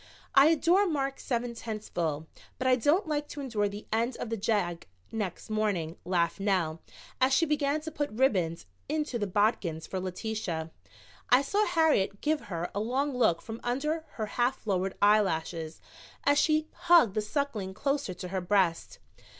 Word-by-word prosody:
"I 275 +2 +7
adore 340 +5 +4
Mark 275 -4 -1
seven 240 -2 -2
tenths 220 -2 -6
full, 160 -3 -2 0.3
but 255 - -4
I 255 0 +5
don't 295 - +2
like 295 -1 -1
to 295 - -8
endure 220 -7 -1
the 205 +1 -8
end 230 +3 0
of 230 - -5
the - - +1
jag 195 -5 -1 0.2
next 210 -1 -4
morning," 200 -7 0
laughed 175 0 0
Nell, 180 -5 0 0.4
as 260 +1 +4
she 330 - +4
began 295 0 0
to 320 +1 -6
put 290 -2 -2
ribbons 195 -9 +1 0.2
into 300 -5 -1
the 205 - -1
bodkins 185 -5 0
for 190 - -4
Letitia. 185 -3 -4 0.6
I 255 +2 +6
saw 415 +9 +1
Harriet 300 - +2
give 305 0 0
her 170 -1 -3
a 200 - -2
long 260 +6 -1
look 175 -9 +2
from 225 +1 -7
under 300 +6 -1
her 220 - -3
half 245 +4 -1
lowered 190 -2 -1
eyelashes 165 -6 +2 0.4
as 285 0 +4
she 310 0 +2 0.2
hugged 330 - +7
the 215 - 0
Suckling 210 -5 -3
closer 275 -8 -1
to 180 0 -7
her 190 0 -2
breast. 180 -2 +1
220 Hz, 170 wpm, -29 LUFS, 185-280 Hz, 0.6 s, I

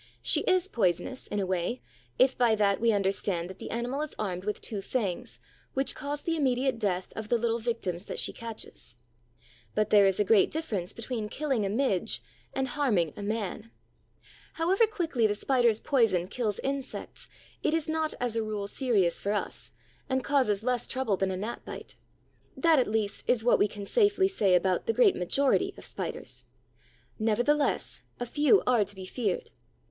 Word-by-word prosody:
She - - +2
is 370 0 +3
poisonous, 225 - 0
in 205 - -2
a 195 - 0
way, 185 +6 -1 0.4
if 260 0 +4
by 235 -3 +3
that 200 -1 +2
we 230 0 +4
understand 195 -3 0
that 190 - -13
the - - -7
animal 245 +5 -2
is 305 - -5
armed 185 -3 -3
with 210 - -2
two 205 -3 -4
fangs 195 -5 -2 0.4
which 270 +1 +2
cause 290 0 -4
the 330 - 0
immediate 265 -4 +1
death 185 -4 -1
of 220 -1 -6
the 240 - +3
little 230 0 0
victims 215 -6 -3
that - - -6
she - - -2
catches; 225 - -8 0.8
but 215 0 +1
there 205 -2 +7
is 195 0 +1
a - - +5
great 205 0 +4
difference 215 - -2
between 230 -2 -4
killing 265 -7 -1
a - - -2
Midge 220 -2 0 0.3
and 265 -1 -1
harming 235 - +1
a - - -7
Man. 215 +1 -3 0.8
However 380 +7 +3
quickly 325 - +1
the 205 - -1
Spider's 240 -1 +2
poison 225 -10 +2
kills 210 -1 -2
insects, 275 -1 -4 0.3
it 310 - +1
is 325 -2 0
not 315 0 -1
as 240 -2 0
a 225 - +1
rule 215 -2 -3
serious 205 -5 +1
for 200 - 0
us 210 - -4 0.4
and 260 -1 0
causes 245 -8 +2
less 250 -1 0
trouble 260 -6 0
than 190 0 0
a 185 - -2
gnat 215 +5 -5
bite. - - -9 0.6
That, 330 -4 +5
at 250 - +2
least, 210 -1 -1
is 240 -3 +3
what 245 - +4
we - - +4
can 205 -1 -8
safely 405 - +3
say 205 - +3
about 185 0 +1
the 455 - +2
great 450 -5 +5
majority 265 +10 +1
of - - -10
Spiders. - - -4 0.8
Nevertheless, 240 +7 +1 0.2
a 245 - -2
few 295 - +4
are 245 -4 +4
to 205 +1 -7
be 190 -1 -8
feared. 205 -1 -2
230 Hz, 185 wpm, -29 LUFS, 200-270 Hz, 0.8 s, there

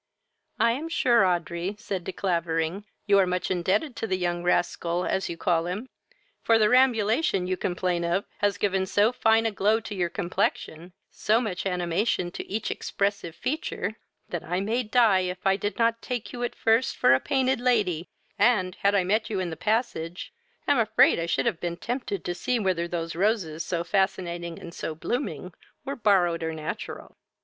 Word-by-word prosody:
"I 230 - +4
am 295 +7 -3
sure, 240 -9 +3
Audrey, 175 +2 -2
(said 195 -3 -4
De - - -3
Clavering,) 170 0 -1 0.2
you 200 -1 +5
are 190 - +4
much 180 +1 -1
indebted 195 - 0
to 225 - -3
the 190 -2 0
young 175 -1 -1
rascal, 175 0 0
as 190 - -1
you 170 - -5
call 170 -1 +1
him; 205 +9 -4 0.5
for 230 - +4
the 215 -1 +4
rambulation 235 - +3
you 185 +1 0
complain 180 -1 -1
of 175 +4 0
has 205 -1 +1
given 190 -2 0
so 205 +4 +3
fine 225 -2 +3
a 225 - +1
glow 210 +2 +2
to 215 - -7
your 180 -3 -1
complexion, 175 -2 -2 0.2
so 220 +2 +2
much 200 -6 -3
animation 180 +1 0
to - - -7
each 215 +2 -2
expressive 200 -4 -2
feature, 255 -6 -3 0.3
that 175 - -4 0.2
may 225 +4 0
I - - +2
die 225 -4 +4
if 180 0 -4
I 195 0 +4
did 205 +2 -3
not 230 0 +2
take 245 -3 -4
you 245 - -6
at 240 - -2
first 230 +4 +2
for 130 - +5
a 130 - +4
painted 265 - +1
lady, 205 -9 +1 0.3
and, 185 -7 +3
had 200 +1 +2
I 195 - +3
met 215 +5 0
you 205 -3 -1
in 180 -2 -2
the - - -4
passage, 200 -5 -2 0.3
am 285 -3 +4
afraid 220 -5 +4
I 165 - -2
should 135 -5 0
have 165 - 0
been 170 -1 -3
tempted 235 -5 -4
to 175 - -1
see 245 +7 -1
whether 185 -5 0
those 165 -1 -4
roses 180 -5 0
so 170 0 -2
fascinating 175 -3 -1
and 170 - -10
so 160 - -5
blooming 180 - -3 0.3
were 275 0 -3
borrowed 185 -7 +2
or 160 0 -3
natural." 155 -1 -6
190 Hz, 190 wpm, -26 LUFS, 175-225 Hz, 0.5 s, you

